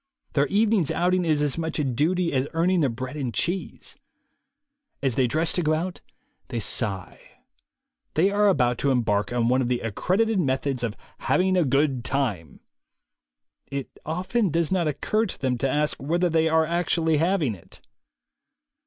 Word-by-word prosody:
Their 140 0 +2
evening's 205 -4 +2
outing 180 +1 +1
is 155 -2 +2
as 145 +2 0
much 160 -1 -2
a 150 - 0
duty 165 +7 0
as 130 +1 +1
earning 175 +3 +2
their 145 -5 +2
bread 130 +4 -6
and 135 -5 -3
cheese. 180 +9 -3 1.1
As 135 -3 +2
they 130 +1 +2
dress 160 +7 0
to 180 - 0
go 155 -1 +2
out, 175 +3 -4 0.5
they 120 - -3
sigh. 100 -3 -2 0.9
They 185 +6 +3
are 205 +1 +3
about 125 -10 +2
to 140 - +1
embark 110 -5 +1
on 120 -1 +1
one 130 +2 +3
of 125 - 0
the 125 -1 0
accredited 190 - 0
methods 135 -3 0
of 115 -3 -3 0.2
"having 185 0 +2
a 180 - +4
good 135 -2 +1
time"; 110 - -2 1.1
it 140 -1 -6
often 185 +7 -1
does 165 +1 0
not 180 -4 +1
occur 215 +9 0
to - - -7
them 130 -2 0
to 135 - 0
ask 150 +2 0
whether 170 +5 +1
they 160 0 +2
are 160 0 +3
actually 165 -1 +1
having 165 - +1
it. 90 - -14
150 Hz, 170 wpm, -25 LUFS, 130-175 Hz, 1.1 s, a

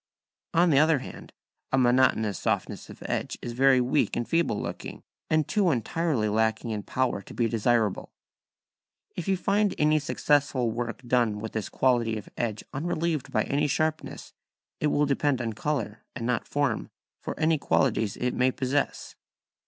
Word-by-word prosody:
On 170 0 +5
the 135 - +5
other 155 0 +4
hand, 130 - -9 0.4
a 135 - +2
monotonous 120 -5 +3
softness - - -2
of - - -11
edge - - -2
is 120 - -5
very 130 +1 +5
weak 125 +4 +1
and 120 - -2
feeble 165 -10 +1
looking, - - -6 0.3
and 155 -1 +2
too 205 -4 +2
entirely 135 -1 0
lacking 110 +2 0
in 105 -1 -2
power 125 -1 -1
to - - -12
be 120 - +2
desirable. 115 -2 0 1.0
If 175 - -5
you 190 -1 +2
find 200 +2 +1
any 155 +1 +3
successful 140 -4 +1
work 120 +2 -4
done 120 -4 +1
with 110 +1 -5
this 110 -2 -3
quality 120 -4 +1
of 105 - -9
edge 110 -3 -2
unrelieved 160 0 -2
by - - +2
any 145 +2 0
sharpnesses, 155 +3 -2 0.5
it 150 - +1
will 150 0 +2
depend 140 -1 +1
on 115 -2 -2
colour, 115 -4 -3
and 120 -1 -4
not 125 -1 -1
form, 140 -5 -1 0.3
for - - -6
any 160 -1 +2
qualities 110 -7 +1
it 125 0 -1
may 125 +1 +3
possess. 130 +2 -2
130 Hz, 165 wpm, -27 LUFS, 115-150 Hz, 1.0 s, On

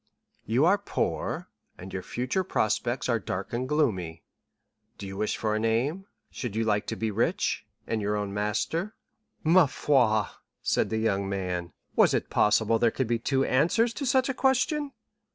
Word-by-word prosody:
"'You 125 +7 +3
are 200 +4 +4
poor, 200 - -2 0.3
and 95 +2 -10
your 95 - -3
future 125 - -2
prospects 120 - 0
are 115 -2 +2
dark 95 0 -5
and 125 +2 -2
gloomy. 95 - 0 0.7
Do - - -7
you 95 0 -7
wish 105 +2 -1
for 110 -1 -1
a - - 0
name? 130 - 0 0.2
should 120 -5 -5
you 115 - +1
like 105 -1 0
to - - -2
be 110 -1 -2
rich, 110 +3 0 0.2
and 110 -1 -2
your 105 +1 0
own 100 -1 -3
master?'" 110 - -1 0.5
"Parbleu!" 140 - +4 0.4
said - - +1
the 110 - -1
young 100 -3 0
man; 90 -3 -3 0.2
"was - - +5
it - - -2
possible 110 +1 +3
there 115 - +4
could 130 +3 -1
be 115 0 0
two 135 +3 +1
answers 190 - +2
to 280 +1 -3
such 260 +1 +3
a 270 - -1
question?" 275 +3 +1
115 Hz, 170 wpm, -27 LUFS, 105-155 Hz, 0.7 s, was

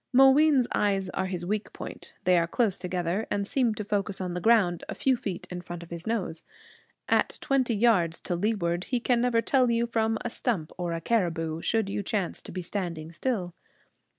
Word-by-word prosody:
Mooween's 270 0 +6
eyes 195 -2 +1
are 190 - -1
his 180 -2 -4
weak 210 +3 -2
point. - - -8
They 180 -1 +4
are 170 - 0
close 210 0 +1
together, 180 +3 -2
and 200 -1 -1
seem 235 0 +1
to 210 - -4
focus 200 -1 -1
on 180 -2 -3
the 180 - -3
ground 195 -6 +3
a - - -4
few 265 -1 +2
feet 195 -7 -5
in 180 0 -4
front 175 -1 -7
of 170 - -15
his 170 +2 -6
nose. 190 -8 -2 0.7
At - - +2
twenty 260 -4 +1
yards 200 -7 +3
to 175 - -2
leeward 175 -3 0
he 250 - 0
can 240 0 +2
never 235 -2 +2
tell 255 -3 +3
you 235 0 +2
from 225 -1 0
a - - 0
stump 185 -13 -1
or 175 -1 -3
a 165 - -3
caribou, 165 -6 0
should 225 +1 +1
you 200 - -2
chance 200 -2 -2
to - - -10
be 185 +1 -4
standing 170 -4 -4
still. 180 -1 -2
200 Hz, 205 wpm, -27 LUFS, 175-230 Hz, 0.7 s, Mooween's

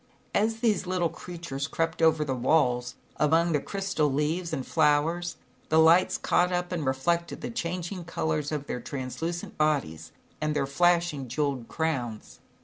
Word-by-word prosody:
As 225 +2 +1
these 215 -6 +1
little 180 -2 +1
creatures 165 -7 -6
crept 165 +1 -2
over 160 -1 +4
the 135 - -1
walls, 125 -2 +1 0.2
among 165 +4 +3
the 150 - +2
crystal 190 -4 -1
leaves 160 +5 -1
and 135 -5 -3
flowers, 165 +4 +1 0.3
the 160 - +3
lights 165 +3 +5
caught 180 +1 +2
up 180 0 -1
and 170 -4 -2
reflected 170 +6 0
the 240 - -4
changing 180 -3 -4
colors 155 -3 -2
of 150 -2 -3
their 125 - -4
translucent 150 +8 -5
bodies, 80 - 0 0.3
and 155 0 0
their 140 -2 +1
flashing 170 -1 +2
jewelled 135 -2 -2
crowns. 125 -9 -3
160 Hz, 150 wpm, -27 LUFS, 140-175 Hz, 0.3 s, lights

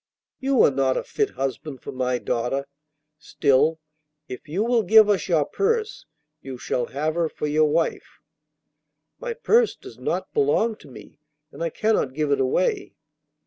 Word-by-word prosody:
'You 270 -2 +3
are - - +5
not 135 -1 +1
a - - -2
fit 425 -2 -1
husband 135 0 -4
for - - -6
my 125 -1 -1
daughter. 125 +3 -2 0.5
Still, 150 +1 +2 0.5
if 125 +4 -9
you 185 +8 0
will 235 0 +2
give 220 +2 +6
us 205 -2 +1
your 160 -5 +2
purse, 435 - -1 0.3
you 130 -1 -8
shall 120 0 -2
have 150 +4 -2
her 165 -1 0
for - - -5
your 150 +1 +2
wife.' 165 +2 -1 1.0
'My - - -4
purse 470 0 +2
does - - -13
not - - -3
belong 410 - +2
to - - -16
me, 135 - -14 0.3
and - - -11
I 165 - 0
cannot 185 -8 0
give 150 -1 -1
it 140 - +2
away. 390 - 0
155 Hz, 165 wpm, -23 LUFS, -, 1.0 s, give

